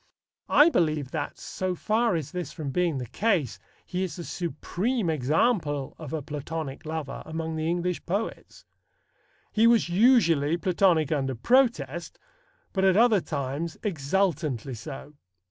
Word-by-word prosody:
I 295 Hz, +3 st, +7 dB
believe 155 Hz, -, 0 dB
that, 145 Hz, -3 st, -4 dB
so 185 Hz, -1 st, -3 dB
far 220 Hz, +2 st, +1 dB
is 155 Hz, -5 st, -3 dB
this 180 Hz, -5 st, -4 dB
from 150 Hz, -5 st, -5 dB
being 170 Hz, -2 st, +1 dB
the 125 Hz, -, -4 dB
case, 140 Hz, -, 0 dB, 0.3 s
he 185 Hz, 0 st, -3 dB
is 185 Hz, -, -4 dB
the 175 Hz, -, -6 dB
supreme 180 Hz, -, -2 dB
example 150 Hz, -, 0 dB
of 155 Hz, -4 st, -7 dB
a 160 Hz, -3 st, -3 dB
Platonic 150 Hz, 0 st, -5 dB
lover 155 Hz, -3 st, -4 dB
among 160 Hz, 0 st, -4 dB
the 155 Hz, 0 st, -2 dB
English 175 Hz, +1 st, -1 dB
poets. 200 Hz, +6 st, -4 dB, 0.9 s
He 225 Hz, +1 st, +4 dB
was 230 Hz, -6 st, +4 dB
usually 175 Hz, -, +4 dB
Platonic 175 Hz, -4 st, +2 dB
under 135 Hz, -3 st, 0 dB
protest, 170 Hz, -, +1 dB, 0.6 s
but 190 Hz, -, 0 dB
at 190 Hz, 0 st, +4 dB
other 225 Hz, -4 st, +5 dB
times 145 Hz, +2 st, -4 dB
exultantly 155 Hz, -, -1 dB
so. 140 Hz, +4 st, -8 dB
165 Hz, 140 wpm, -27 LUFS, 145-190 Hz, 0.9 s, I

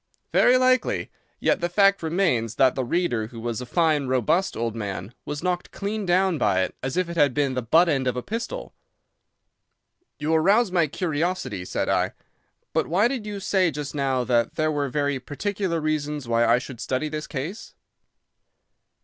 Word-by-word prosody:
"Very 250 Hz, +1 st, +5 dB
likely. 255 Hz, 0 st, +1 dB, 0.3 s
Yet -, -, +1 dB
the 175 Hz, -, 0 dB
fact 195 Hz, +2 st, +4 dB
remains 160 Hz, -, 0 dB
that 130 Hz, -2 st, +4 dB
the 130 Hz, -, -2 dB
reader, 120 Hz, -6 st, 0 dB
who 115 Hz, 0 st, -10 dB
was 120 Hz, +1 st, -3 dB
a 125 Hz, -, -7 dB
fine, 155 Hz, -4 st, +2 dB
robust 130 Hz, -, +1 dB
old 115 Hz, -1 st, -2 dB
man, 100 Hz, -1 st, -5 dB
was 145 Hz, +2 st, -5 dB
knocked 180 Hz, -1 st, -1 dB
clean 205 Hz, 0 st, -4 dB
down 180 Hz, -2 st, +2 dB
by 95 Hz, -3 st, +2 dB
it -, -, -4 dB
as 135 Hz, +5 st, -3 dB
if 185 Hz, -1 st, +1 dB
it 170 Hz, 0 st, -6 dB
had 145 Hz, -5 st, +3 dB
been 140 Hz, -2 st, +1 dB
the 130 Hz, -, -1 dB
butt 160 Hz, +10 st, +4 dB
end 135 Hz, -5 st, +1 dB
of 125 Hz, 0 st, 0 dB
a 125 Hz, -, -3 dB
pistol." 235 Hz, -, -5 dB, 1.4 s
"You 155 Hz, +2 st, -1 dB
arouse 195 Hz, +7 st, +4 dB
my 170 Hz, -3 st, +3 dB
curiosity," 155 Hz, -, -2 dB
said -, -, -2 dB
I. -, -, +1 dB, 0.6 s
"But -, -, +1 dB
why 195 Hz, +7 st, +3 dB
did 245 Hz, -5 st, -4 dB
you 205 Hz, -1 st, -4 dB
say 190 Hz, -2 st, +2 dB
just 145 Hz, -1 st, -5 dB
now 135 Hz, -3 st, 0 dB
that 120 Hz, -1 st, +1 dB
there 155 Hz, -1 st, +1 dB
were 145 Hz, -2 st, -1 dB
very 145 Hz, 0 st, 0 dB
particular 180 Hz, +6 st, -2 dB
reasons 150 Hz, -3 st, -2 dB
why 115 Hz, 0 st, +2 dB
I 115 Hz, +1 st, +5 dB
should 125 Hz, -2 st, -7 dB
study 130 Hz, +5 st, -1 dB
this 150 Hz, 0 st, -5 dB
case?" 155 Hz, +9 st, -6 dB
150 Hz, 185 wpm, -24 LUFS, 125-180 Hz, 1.4 s, Very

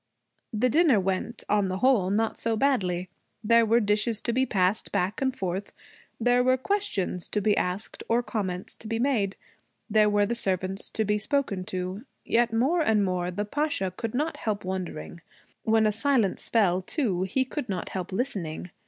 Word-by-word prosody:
The 225 Hz, +2 st, +2 dB
dinner 295 Hz, -3 st, +4 dB
went, 195 Hz, +4 st, -2 dB
on 205 Hz, -1 st, +2 dB
the 185 Hz, 0 st, -2 dB
whole, 220 Hz, -4 st, +3 dB
not 220 Hz, +3 st, +1 dB
so 225 Hz, -1 st, -1 dB
badly. 185 Hz, -10 st, +1 dB, 0.4 s
There 230 Hz, +1 st, +5 dB
were 230 Hz, +2 st, +4 dB
dishes 210 Hz, +1 st, +1 dB
to 235 Hz, -, -1 dB
be 260 Hz, +2 st, +2 dB
passed 190 Hz, +2 st, +1 dB
back 200 Hz, +3 st, -1 dB
and 265 Hz, -1 st, +2 dB
forth. 190 Hz, -4 st, -4 dB, 0.5 s
There 245 Hz, +1 st, +3 dB
were 255 Hz, +1 st, +3 dB
questions 260 Hz, -, -1 dB
to 210 Hz, -, -1 dB
be 210 Hz, 0 st, +2 dB
asked 180 Hz, +4 st, -3 dB
or 235 Hz, +2 st, +2 dB
comments 195 Hz, -5 st, -3 dB
to 220 Hz, -, -10 dB
be 225 Hz, +1 st, -1 dB
made. 230 Hz, -6 st, +1 dB, 0.6 s
There 210 Hz, 0 st, +5 dB
were 205 Hz, 0 st, +3 dB
the 230 Hz, -, -1 dB
servants 190 Hz, -3 st, -1 dB
to 220 Hz, -, -1 dB
be 210 Hz, +1 st, +1 dB
spoken 215 Hz, -6 st, -1 dB
to. 185 Hz, +1 st, -4 dB, 0.2 s
Yet, 235 Hz, 0 st, +2 dB
more 270 Hz, +10 st, +2 dB
and 220 Hz, -8 st, +3 dB
more, 180 Hz, -1 st, -1 dB
the 205 Hz, +4 st, -3 dB
Pasha 245 Hz, -, -1 dB
could 230 Hz, +3 st, -4 dB
not 305 Hz, +5 st, -1 dB
help 210 Hz, -3 st, -3 dB
wondering. 180 Hz, -3 st, -5 dB, 0.4 s
When 220 Hz, 0 st, +4 dB
a 215 Hz, -, +3 dB
silence 225 Hz, -2 st, +1 dB
fell, 190 Hz, -5 st, +3 dB
too, 195 Hz, -, -1 dB
he 205 Hz, +8 st, +1 dB
could 260 Hz, -2 st, -5 dB
not 190 Hz, -, -3 dB
help 185 Hz, 0 st, -5 dB
listening. 185 Hz, -, -3 dB
210 Hz, 180 wpm, -27 LUFS, 190-240 Hz, 0.6 s, There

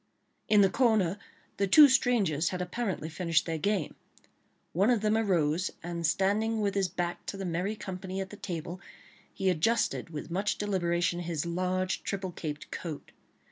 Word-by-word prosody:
In 210 Hz, -1 st, +6 dB
the 195 Hz, -, +5 dB
corner 210 Hz, -7 st, +2 dB, 0.4 s
the 200 Hz, -, +1 dB
two 295 Hz, +10 st, +9 dB
strangers 225 Hz, -, +2 dB
had 180 Hz, -, -4 dB
apparently 180 Hz, -2 st, -3 dB
finished 165 Hz, 0 st, 0 dB
their 165 Hz, -1 st, -2 dB
game; 200 Hz, -1 st, 0 dB, 0.8 s
one 195 Hz, +7 st, +3 dB
of 240 Hz, -4 st, +3 dB
them 215 Hz, 0 st, +2 dB
arose, 180 Hz, -6 st, +1 dB
and 170 Hz, -1 st, -2 dB
standing 215 Hz, +6 st, +1 dB
with 200 Hz, -2 st, 0 dB
his 195 Hz, -2 st, +1 dB
back 175 Hz, 0 st, -3 dB
to 200 Hz, -, -4 dB
the 195 Hz, -, -4 dB
merry 180 Hz, +5 st, -1 dB
company 190 Hz, -1 st, -6 dB
at 190 Hz, 0 st, -4 dB
the -, -, -8 dB
table, 175 Hz, -1 st, -6 dB, 0.5 s
he 195 Hz, -, -3 dB
adjusted 185 Hz, +3 st, +1 dB
with 155 Hz, 0 st, -7 dB
much 195 Hz, +4 st, 0 dB
deliberation 175 Hz, -4 st, 0 dB
his 170 Hz, -3 st, -3 dB
large 185 Hz, +2 st, -1 dB
triple 190 Hz, -2 st, -3 dB
caped 150 Hz, -3 st, -6 dB
coat. 160 Hz, -5 st, -6 dB
185 Hz, 165 wpm, -29 LUFS, 170-205 Hz, 0.8 s, two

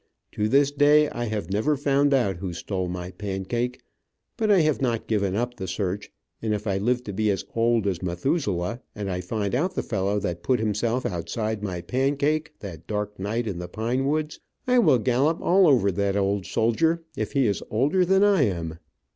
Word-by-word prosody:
To 105 Hz, -, -1 dB
this 140 Hz, +2 st, +4 dB
day 145 Hz, +1 st, +4 dB
I 120 Hz, 0 st, -3 dB
have 105 Hz, -3 st, -3 dB
never 125 Hz, +9 st, +1 dB
found 140 Hz, +1 st, +2 dB
out 120 Hz, -10 st, +2 dB
who 90 Hz, 0 st, -5 dB
stole 95 Hz, +1 st, -3 dB
my 90 Hz, 0 st, -5 dB
pancake, 105 Hz, +6 st, -3 dB, 0.5 s
but 220 Hz, -1 st, 0 dB
I 195 Hz, -4 st, +6 dB
have 155 Hz, -2 st, +1 dB
not 120 Hz, -4 st, 0 dB
given 100 Hz, -3 st, 0 dB
up 120 Hz, +3 st, -2 dB
the 95 Hz, -, -5 dB
search, 100 Hz, +1 st, -3 dB, 0.3 s
and 110 Hz, -1 st, 0 dB
if 105 Hz, +1 st, -6 dB
I 100 Hz, -2 st, 0 dB
live 125 Hz, +4 st, 0 dB
to 105 Hz, -, -6 dB
be 110 Hz, +2 st, +1 dB
as 100 Hz, -, -1 dB
old 115 Hz, -2 st, +2 dB
as 95 Hz, -4 st, -1 dB
Methuselah, 95 Hz, -, -1 dB
and 100 Hz, -2 st, -3 dB
I 90 Hz, 0 st, -2 dB
find 100 Hz, +2 st, -3 dB
out 175 Hz, +9 st, 0 dB
the -, -, -1 dB
fellow 100 Hz, +2 st, -1 dB
that 85 Hz, -3 st, -3 dB
put 125 Hz, +3 st, +1 dB
himself 110 Hz, +3 st, 0 dB
outside 110 Hz, +5 st, -3 dB
my 90 Hz, -4 st, -4 dB
pancake 140 Hz, -, 0 dB
that 85 Hz, -5 st, -9 dB
dark 105 Hz, -1 st, -3 dB
night 110 Hz, +5 st, -2 dB
in 95 Hz, -5 st, -4 dB
the 90 Hz, -, -5 dB
pine 120 Hz, +5 st, -1 dB
woods, 155 Hz, +1 st, -1 dB, 0.3 s
I 250 Hz, 0 st, +4 dB
will 155 Hz, -, +5 dB
gallop 130 Hz, +7 st, +1 dB
all 185 Hz, +1 st, +4 dB
over 120 Hz, -9 st, +4 dB
that 100 Hz, +1 st, 0 dB
old 100 Hz, -1 st, 0 dB
soldier, 160 Hz, +9 st, +1 dB
if -, -, -3 dB
he 135 Hz, -3 st, +3 dB
is 100 Hz, -3 st, 0 dB
older 145 Hz, -, +2 dB
than 190 Hz, +2 st, +3 dB
I 200 Hz, -5 st, +4 dB
am. 80 Hz, -4 st, -4 dB
110 Hz, 200 wpm, -25 LUFS, 100-140 Hz, 0.5 s, I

